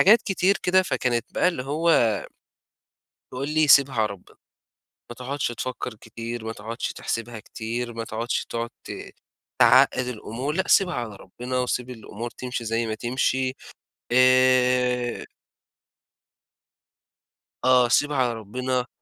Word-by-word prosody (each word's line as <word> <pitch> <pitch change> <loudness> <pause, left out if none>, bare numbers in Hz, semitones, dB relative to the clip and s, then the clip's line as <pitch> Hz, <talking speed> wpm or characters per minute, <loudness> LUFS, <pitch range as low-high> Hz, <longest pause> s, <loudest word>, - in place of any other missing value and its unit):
حاجات 215 +5 +6
كتير 195 0 +1
كده، 185 +1 +4
فكانت 125 - -1
بقى - - +3
اللي 170 -8 -3
هو 145 -4 +2 1.2
تقول 130 +3 -4
لي: 155 0 +2
"سيبها 140 -1 +6
على 110 -2 +2
ربنا. 100 -3 -11 0.8
ما - - -7
تقعُدش 135 +4 -3
تفكّر 125 +1 -5
كتير، 115 +1 -7
ما 110 - -4
تقعُدش 115 +3 -5
تحسبها 115 0 -4
كتير، 120 +3 -5
ما 115 0 -4
تقعُدش 115 +2 -3
تقعد 115 0 -3
ت - - -8 0.7
تعقّد 130 0 +5
الأمور 125 +4 -4
لأ 190 +3 -1
سيبها 185 -2 +4
على 115 -4 -4
ربنا 125 +7 -5
وسيب 125 0 -2
الأمور 115 -1 -7
تمشي 125 -1 -5
زي 115 +1 -1
ما 110 - -2
تمشي." 130 +3 0 0.6
آآ 125 -1 +3 2.4
آه. 125 -1 +5
سيبها 145 +4 +2
على 125 -2 +2
ربنا. 125 +4 -3
125 Hz, 130 wpm, -24 LUFS, 115-130 Hz, 2.4 s, حاجات